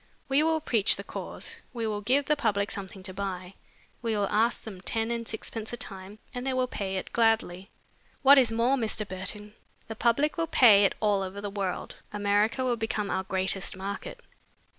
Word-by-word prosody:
We 275 +1 +3
will 320 0 +2
preach 230 -9 +3
the - - -6
cause. - - -6 0.2
We 230 -2 -3
will 210 -1 -2
give 265 +7 +2
the 300 - +2
public 210 -7 0
something 190 -1 -7
to 185 0 -5
buy. 185 -1 -5 0.5
We 225 -3 -1
will 200 -1 +1
ask 225 +3 +2
them 195 -5 -9
ten 225 +3 0
and 230 -1 -3
sixpence 220 0 -4
a - - -3
time 195 -1 -5 0.2
and 245 - -4
they 265 0 -1
will 255 0 +1
pay 195 -6 -4
it 185 - -6
gladly. 220 -5 +1 0.5
What 280 +1 +9
is 245 -4 +3
more, 235 +4 +2
Mr. 220 -3 -1
Burton, 205 +3 -6 0.3
the 225 - -6
public 280 +9 +2
will 330 - +1
pay 210 -9 +7
it - - +1
all 205 -2 +2
over 190 +1 -5
the 205 0 -5
world. 195 -3 -3
America 205 +4 +1
will 245 -2 +1
become 220 -2 -2
our - - 0
greatest 190 0 -1
market. 200 - -5
215 Hz, 195 wpm, -28 LUFS, 195-240 Hz, 0.5 s, What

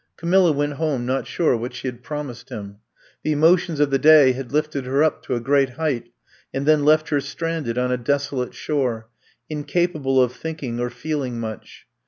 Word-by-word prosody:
Camilla 175 +1 +3
went 145 0 -1
home 140 -4 -1
not 130 +2 -1
sure 165 -7 +1
what 120 +2 -5
she 125 - -5
had 125 -1 -6
promised 140 -3 -6
him. 100 -1 -8 0.4
The 155 - -1
emotions 165 +1 +3
of 145 -1 +2
the 135 - +2
day 150 -3 +7
had 130 -1 -6
lifted 150 -2 -1
her 135 +3 +2
up 155 - +1
to 125 - -1
a - - -1
great 135 +2 +2
height, 140 -7 -1 0.4
and 135 +1 -3
then 155 -1 +4
left 155 +1 +4
her 145 -2 +1
stranded 140 -3 -3
on 125 0 +1
a 125 - +1
desolate 140 0 -1
shore^ 125 -7 -1 0.4
incapable 150 -2 0
of 125 -1 +3
thinking 145 -6 -5
or 120 0 -1
feeling 130 -3 -3
much. 110 -2 -8
140 Hz, 190 wpm, -22 LUFS, 125-155 Hz, 0.4 s, day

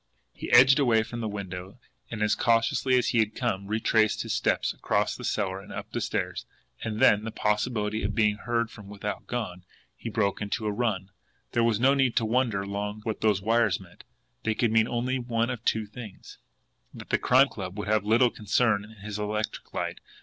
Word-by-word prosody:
He - - -7
edged 130 +4 +7
away 115 -5 +3
from 120 +1 -7
the 110 - -2
window, 95 -1 -6 0.3
and, 110 -2 -3
as 105 - +3
cautiously 115 +3 +2
as 125 - +1
he 120 - +2
had 110 -1 +1
come, 95 +1 -2
retraced 110 0 +2
his - - -3
steps - - +1
across - - 0
the - - -9
cellar 95 -2 -1
and - - -13
up - - -7
the - - -2
stairs - - -3 0.4
and 110 -1 -3
then, 105 0 +5
the 110 - -4
possibility 105 0 -1
of 100 +1 -2
being 105 -2 +2
heard 115 0 -1
from 105 -3 -12
without 105 0 -5
gone, 100 -7 -4 0.3
he 115 - -6
broke 105 -3 0
into 105 +2 -3
a 105 - +1
run. 100 -4 -2 0.4
There 120 - +2
was 115 -2 +2
no 135 +3 +5
need 135 -3 +2
to 115 - +2
wonder 115 -4 +1
long 105 +1 -4
what 110 -1 -3
those 105 -3 +2
wires 110 -4 +2
meant. - - -15 0.4
They 110 -1 -1
could 115 -1 +1
mean 110 0 +4
only 125 +2 -1
one 120 0 -1
of 120 -2 -6
two 110 -1 +1
things 105 -2 -11 0.5
and - - -9
the - - -1
Crime 130 +2 +5
Club 95 -1 -7
would 100 -2 -4
have 110 -1 +2
little 115 +3 +4
concern 105 0 +1
in 105 -2 -14
his 105 -1 -4
electric 105 +1 -3
light! - - -3
110 Hz, 205 wpm, -27 LUFS, 105-115 Hz, 0.5 s, edged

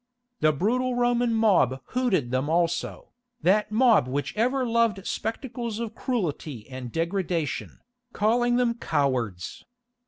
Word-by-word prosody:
The 155 - +4
brutal 245 - 0
Roman 245 0 +2
mob 205 - +3
hooted 195 - 0
them 130 +3 0
also, 175 - -1 0.3
that 210 +4 +3
mob 225 - +4
which 140 +3 -3
ever 255 +4 +1
loved 230 -4 +1
spectacles 230 0 -4
of 230 -1 -4
cruelty 160 - -3
and 130 -2 -6
degradation, 170 - -2 0.3
calling 240 +3 +2
them 245 -1 +2
cowards. 125 - -2
210 Hz, 120 wpm, -26 LUFS, 150-240 Hz, 0.3 s, The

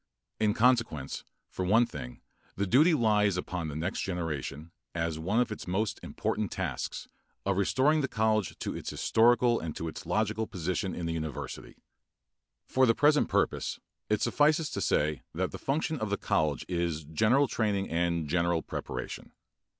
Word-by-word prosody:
In 105 -1 +2
consequence 115 - +1 0.2
for 95 - -4
one 110 +6 +4
thing 60 - -8 0.3
the 100 - 0
duty 150 - +5
lies 105 -6 +3
upon 90 -2 -3
the 75 - -5
next 85 +5 -2
generation, 80 -3 -4 0.2
as 85 -1 -1
one 95 +8 +1
of 125 -2 +1
its 110 - -6
most 100 +4 -1
important - - -2
tasks, - - -3 0.4
of 100 0 +1
restoring 135 +10 +3
the 135 - 0
college 110 -4 0
to - - -4
its - - -5
historical 120 +1 +3
and 80 -2 -5
to 80 - -4
its 80 - -7
logical 110 +1 0
position 95 +1 -2
in 85 - -4
the 85 - -1
university. 80 -3 -5 0.9
For 130 0 +3
the 115 - +4
present 150 +1 +4
purpose - - 0 0.3
it 105 -1 +1
suffices 150 +1 +3
to - - -3
say 75 -3 +1
that - - -1
the - - -7
function 155 +2 -1
of 110 - -2
the 100 - 0
college 75 -5 0
is 85 -3 -1
general 110 - +3
training 105 -5 -1
and 85 -1 0
general 85 +1 +1
preparation. - - -6
100 Hz, 165 wpm, -29 LUFS, 85-115 Hz, 0.9 s, duty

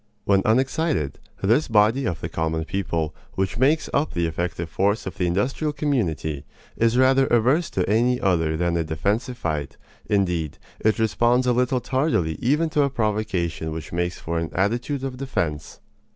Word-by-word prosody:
When 100 -1 +4
unexcited, 130 - +1 0.2
this 115 +10 +3
body 110 +4 +3
of 85 -2 -3
the - - -3
common 80 0 -2
people, 85 -4 -2 0.2
which 95 +4 -2
makes 145 +5 +3
up 145 +2 +1
the 85 -1 +1
effective 85 +1 -3
force 100 +5 0
of 95 - -7
the 90 - +2
industrial 130 - 0
community, 85 - -1 0.3
is 115 +1 +2
rather 130 +1 +4
averse 130 +9 +2
to 90 - -1
any 120 +4 +2
other 80 -4 +1
than 85 0 0
a 85 - +1
defensive 100 - -1
fight; 75 - -3 0.3
indeed, 90 -7 0 0.2
it 110 0 +2
responds 120 +3 +2
a 125 - +3
little 125 +1 +1
tardily 130 - 0
even 150 +7 +2
to 150 - +2
a 140 - +2
provocation 105 -9 -1
which 80 +1 -7
makes 85 0 -1
for 85 0 -3
an 80 - -3
attitude 120 +8 0
of 130 -2 -4
defense. 85 - -3
105 Hz, 165 wpm, -23 LUFS, 85-130 Hz, 0.3 s, When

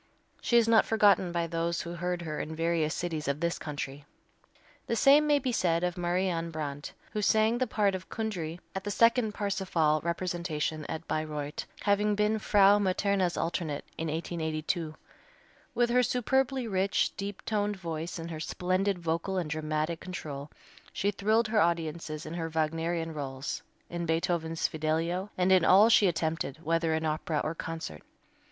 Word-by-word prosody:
She 235 - +3
is 230 -1 +4
not 225 -1 +6
forgotten 205 -4 +4
by 170 -1 0
those 165 0 -1
who 170 - -6
heard 175 0 -2
her 155 -2 -4
in 160 - -4
various 165 -1 0
cities 160 -4 -3
of 140 +1 0
this 170 +1 -1
country. 145 -1 -5 0.8
The 230 - 0
same 285 +6 +6
may 295 -1 +5
be 260 -3 -1
said 170 -6 +1
of 180 -1 0
Marianne 175 -1 0
Brandt, 145 -3 -5 0.2
who 210 - -2
sang 220 +3 +3
the 255 - +1
part 205 -2 +1
of 185 0 -6
Kundry 180 -7 -3
at 190 - -4
the 205 - -3
second 230 +1 +3
"Parsifal" 180 -7 +1
representation 170 -3 -2
at 160 +1 -5
Bayreuth, 150 -1 -3
having 205 +1 +2
been 210 +1 +1
Frau 205 -1 +5
Materna's 190 -2 +1
alternate 165 -3 -2
in 160 - -3
1882. 160 0 -2 0.8
With 240 -1 +2
her 250 +1 +5
superbly 255 +1 +1
rich, 195 -1 +1
deep 200 -1 -6
toned 210 -1 0
voice 165 -1 -4
and 165 0 -6
her 155 - -5
splendid 185 +4 0
vocal 170 +3 -2
and 165 -4 -2
dramatic 155 +1 -1
control 150 -6 -6 0.4
she 200 - 0
thrilled 215 +3 +1
her 215 -1 +3
audiences 165 -2 -1
in 155 - -6
her 165 -1 -3
Wagnerian 165 +1 -1
rôles, 135 -2 -4 0.3
in 170 0 -4
Beethoven's 165 0 0
"Fidelio," 165 +5 -1
and 185 +1 +2
in 185 -2 +6
all 200 +6 +7
she 220 -3 +6
attempted, 160 -4 -1
whether 165 0 +1
in 160 0 -1
opera 155 0 -1
or 155 - -2
concert. 160 - -6
170 Hz, 165 wpm, -29 LUFS, 160-200 Hz, 0.8 s, all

